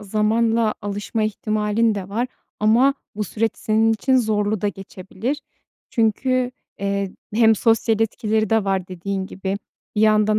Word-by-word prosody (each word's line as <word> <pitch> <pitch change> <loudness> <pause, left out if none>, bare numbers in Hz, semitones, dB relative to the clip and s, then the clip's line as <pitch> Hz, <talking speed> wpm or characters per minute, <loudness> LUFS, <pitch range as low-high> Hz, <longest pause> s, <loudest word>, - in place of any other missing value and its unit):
zamanla 220 +2 +1
alışma 205 +2 -2
ihtimalin 215 0 +1
de 195 -2 -5
var 230 +5 -1 0.3
ama 235 +6 +4 0.2
bu 210 - -1
süreç 225 +3 -1
senin 220 +1 +2
için 260 +4 +2
zorlu 215 -3 +1
da 205 - +1
geçebilir. 195 +7 -5 0.5
Çünkü, 250 +3 +1 0.3
eee, 200 0 -1 0.2
hem 225 -1 +6
sosyal 225 0 +2
etkileri 220 -1 0
de 225 -2 +3
var 190 -2 -1
dediğin 190 +1 -3
gibi. 195 +1 -3 0.4
Bir - - +2
yandan 215 0 +4
215 Hz, 140 wpm, -22 LUFS, 200-225 Hz, 0.5 s, hem